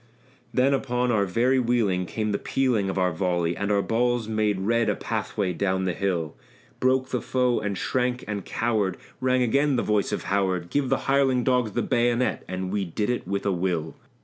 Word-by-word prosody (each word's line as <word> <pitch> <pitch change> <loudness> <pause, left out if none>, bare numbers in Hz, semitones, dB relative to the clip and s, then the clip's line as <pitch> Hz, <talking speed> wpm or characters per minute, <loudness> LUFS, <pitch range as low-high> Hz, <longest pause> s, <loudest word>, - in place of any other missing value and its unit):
Then 130 +2 +3
upon 125 -2 0
our 100 -3 +2
very 125 +7 +2
wheeling 110 -7 +1
came 110 +2 -2
the 100 - -1
pealing 120 -7 0
of 95 - -3
our 90 -1 +2
volley, 85 0 0
And 100 +2 -2
our 100 -1 +2
balls 120 0 0
made 110 -3 0
red 115 +3 +1
a - - +1
pathway 95 -3 -2
down 95 +2 0
the 90 -1 0
hill; 85 -6 -2 0.4
Broke 130 0 +2
the 125 - -1
foe 125 0 +1
and 105 -2 -3
shrank 125 +2 -1
and 105 -2 -3
cowered; 110 -4 -1 0.2
rang 130 0 +2
again 140 +4 +2
the 120 - +1
voice 105 -2 +1
of - - -2
Howard 95 -3 -1
"Give 140 -3 0
the - - +1
hireling 135 -2 +3
dogs 125 -5 +1
the - - 0
bayonet!" 120 +1 +1
and 95 0 -4
we 100 -1 0
did 105 +6 -1
it 125 - -3
with 100 0 -2
a 100 - +2
will. 85 -3 -1
110 Hz, 200 wpm, -25 LUFS, 95-125 Hz, 0.4 s, Then